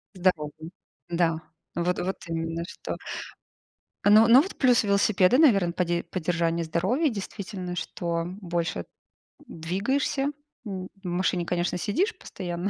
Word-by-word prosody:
Здоровый. 160 -3 -1 0.4
Да, 170 -2 +1 0.4
вот 175 +1 0
вот 190 +2 -1
именно 165 0 -2
что. - - -6 1.1
Ну 215 +2 +7
ну, 250 +4 +9
вот 385 - -7
плюс 250 -4 +4
велосипеда, 200 +2 +4
наверное, 200 - +5
поде 175 -1 0
поддержание 170 -1 -1
здоровья. 190 - +1
Действительно, 195 -3 -5
что 170 -1 -2 0.2
больше 170 - -2 0.6
двигаешься. 205 - -1 0.4
М, 185 -2 -5 0.2
в - - -5
машине, 175 0 0
конечно, 175 0 -1
сидишь 360 - 0
постоянно. 180 0 -4
180 Hz, 120 wpm, -26 LUFS, 170-205 Hz, 1.1 s, ну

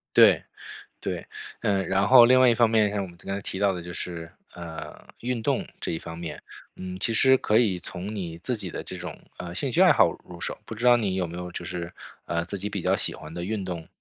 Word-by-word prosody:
对 - - +7 0.6
对。 - - -4 0.3
嗯， 95 -2 +1
然 95 +1 +2
后 125 0 +9
另 130 +2 +6
外 130 - +7
一 120 - +5
方 115 0 +4
面 110 -2 +3
像 100 -1 -1
我 - - -4
们 85 -1 -14
刚 95 - -5
才 100 - -3
提 95 - -5
到 100 0 +3
的 90 -2 -5
就 85 +1 -7
是， 85 -2 -5 0.2
呃， 85 -2 -8
运 120 -1 -2
动 - - 0
这 - - -2
一 80 - -2
方 80 0 -8
面。 85 -1 -6 0.4
嗯， 95 0 -6
其 115 - +1
实 130 +4 +6
可 110 -2 +3
以 105 -7 +2
从 90 +4 -6
你 85 -5 -5
自 125 +8 -2
己 100 -5 -6
的 - - -5
这 - - -7
种 85 -3 -7 0.2
呃， 85 -1 -7
兴 135 +8 -1
趣 - - +1
爱 - - +8
好 - - +5
入 - - -11
手， - - -3
不 - - -7
知 115 +3 -2
道 120 0 +8
你 105 -5 -1
有 90 -2 0
没 85 +1 -8
有 90 0 -5
就 85 - -6
是， 85 -1 -5 0.3
呃， 85 0 -1
自 100 - -4
己 100 +2 -3
比 100 - -3
较 - - +2
喜 - - +1
欢 80 0 -10
的 85 +1 -4
运 105 +1 -2
动？ 85 -3 -5
95 Hz, 280 characters per minute, -26 LUFS, 85-110 Hz, 0.6 s, 后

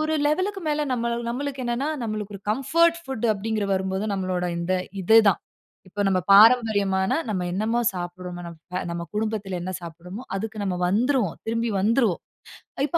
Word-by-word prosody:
ஒரு 310 0 0
லெவலுக்கு 370 +6 0
மேல 300 0 +1
நம்மளு 235 -1 -1
நம்மளுக்கு 270 +2 -3
என்னன்னா 240 +4 -1
நம்மளுக்கு 215 -2 -4
ஒரு - - -15
கம்ஃபோர்ட் 335 +8 +3
ஃபுட் 265 -7 -5
அப்படின்கிறது 215 +1 -2
வரும்போது 190 +1 -1
நம்மளோட 185 -2 -1
இந்த 170 +2 -1 0.3
இது 220 +5 +5
தான். 195 - +2 0.5
இப்ப 205 +3 -6
நம்ம 185 -1 +2
பாரம்பரியமான 205 -3 +5 0.2
நம்ம 195 -4 -1
என்னமோ 220 +5 0
சாப்பிடுறமோ 175 0 -6
நம்ம 170 +2 -6
நம்ம 170 0 -3
குடும்பத்தில 210 -3 -2
என்ன 185 +1 -4
சாப்பிடுறமோ 175 +6 -8
அதுக்கு 220 +2 -5
நம்ம 185 -2 -1
வந்துருவோம். 230 - +1
திரும்பி 230 +1 0
வந்துருவோம். 220 -2 +2 0.7
இப்ப 320 - +1
215 Hz, 155 wpm, -24 LUFS, 185-240 Hz, 0.7 s, இது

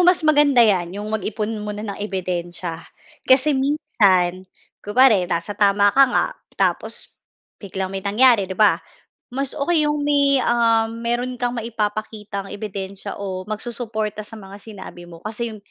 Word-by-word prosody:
mas 355 -1 +4
maganda 290 -4 +5
'yan 185 -5 +2
yung 205 - -5
mag-ipon 215 0 -2
muna 210 0 -5
ng 200 -2 -6
ebidensiya. 175 -4 -4 0.4
Kasi 270 +3 +4
minsan 195 - +2 0.4
kunwari 210 -3 +4
nasa 170 +5 -2
tama 200 0 +4
ka 275 - +7
nga - - +2 0.3
tapos - - -1 0.5
biglang 190 -1 -4
may 195 0 -4
nangyari 210 0 +4
'di 190 - -5
ba, 215 -1 +4 0.5
mas 275 +2 -3
okey 305 +1 +2
yung 295 -1 -1
may, 280 -1 +3
uhm, 230 -2 +1
mayro'n 240 +2 -1
kang 245 0 -1
maipapakitang 215 -3 -4
ebidensiya 200 -1 -6
o 190 -2 -4
magsusuporta 220 -1 -4
sa 215 +1 -10
mga 200 0 -11
sinabi 190 -5 -11
mo 170 - -11
kasi 225 +2 -3
yung 220 - -9
215 Hz, 145 wpm, -21 LUFS, 195-245 Hz, 0.5 s, ka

